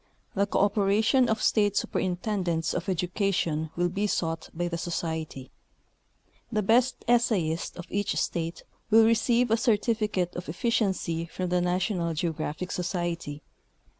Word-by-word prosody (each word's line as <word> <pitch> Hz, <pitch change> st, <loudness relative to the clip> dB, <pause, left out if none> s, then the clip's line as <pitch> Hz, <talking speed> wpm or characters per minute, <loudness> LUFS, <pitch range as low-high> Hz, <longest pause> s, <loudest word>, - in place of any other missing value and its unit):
The 200 Hz, +1 st, +1 dB
cooperation 210 Hz, +5 st, +3 dB
of 220 Hz, 0 st, 0 dB
State 205 Hz, -2 st, +3 dB
Superintendents 180 Hz, -3 st, -1 dB
of 175 Hz, +2 st, -3 dB
Edu 180 Hz, -1 st, -1 dB
cation 165 Hz, -6 st, 0 dB
is 190 Hz, +4 st, 0 dB
sought 165 Hz, -1 st, -2 dB
by 175 Hz, +1 st, -2 dB
the 170 Hz, -, -3 dB
Society. 160 Hz, -5 st, -4 dB, 1.0 s
The 215 Hz, -2 st, 0 dB
best 240 Hz, +5 st, +2 dB
essayist 210 Hz, -9 st, +1 dB
of 175 Hz, -, -7 dB
each 205 Hz, 0 st, 0 dB
state 165 Hz, -1 st, -2 dB, 0.3 s
will 225 Hz, 0 st, +7 dB
receive 230 Hz, +1 st, +3 dB
a 225 Hz, -, +4 dB
certificate 215 Hz, -5 st, +1 dB
of 175 Hz, -, -5 dB
proficiency 190 Hz, -4 st, 0 dB
from 180 Hz, +2 st, -4 dB
the 180 Hz, 0 st, +2 dB
National 180 Hz, -1 st, 0 dB
Geo 165 Hz, +2 st, 0 dB
graphic 155 Hz, +4 st, -4 dB
Society. 170 Hz, -5 st, -3 dB
180 Hz, 135 wpm, -27 LUFS, 170-215 Hz, 1.0 s, will